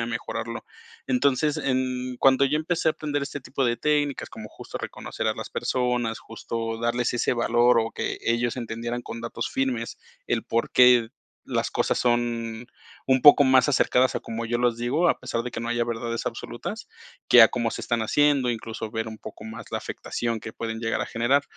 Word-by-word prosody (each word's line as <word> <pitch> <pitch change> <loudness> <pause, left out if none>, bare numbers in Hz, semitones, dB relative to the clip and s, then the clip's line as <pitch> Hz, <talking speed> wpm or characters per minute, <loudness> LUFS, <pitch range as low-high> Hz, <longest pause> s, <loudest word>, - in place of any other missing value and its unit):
a 115 - -1
mejorarlo. 120 -1 -4 0.4
Entonces, 140 +3 +1
en 130 -2 -1
cuando 135 0 +5
yo 140 +2 +1
empecé 160 +1 0
a - - +5
atender 145 -2 -3
este 140 +1 -5
tipo 135 +1 -2
de 120 -1 +1
técnicas, 145 -1 0
como 110 -1 -9
justo - - -8
reconocer - - -4
a - - 0
las - - -7
personas, 125 -3 -1
justo 115 0 -5
darles 120 +1 0
ese 120 - +1
valor, 120 0 +3
o 115 0 -1
que - - -3
ellos 120 0 0
entendieran 120 0 -4
con 115 - -7
datos 115 0 -4
firmes 125 -3 -2 0.3
el - - 0
por 115 0 -1
qué 125 -2 +6 0.4
las - - -2
cosas - - +1
son 120 -1 -1 0.4
un 130 0 +4
poco 145 +1 +8
más 130 0 +5
acercadas 130 -2 +3
a - - -1
como 115 +1 -5
yo 120 +1 -1
los 120 -1 +1
digo, 140 +9 +1
a - - +1
pesar 125 -2 -3
de 125 - -5
que - - -6
no 115 0 -4
haya 120 0 0
verdades 115 0 -3
absolutas, - - -6 0.4
que 120 - +9
a 115 - +8
cómo 120 -2 -1
se - - -5
están 120 -1 -1
haciendo, 140 +3 +2
incluso, 115 -1 -4
ver 110 -1 -2
un 110 0 -9
poco 110 - -10
más 110 +1 -8
la - - 0
afectación 115 -1 -4
que 110 0 -8
pueden 115 0 -5
llegar 115 0 -1
a - - -2
generar. 125 +5 +2
120 Hz, 200 wpm, -25 LUFS, 115-130 Hz, 0.4 s, que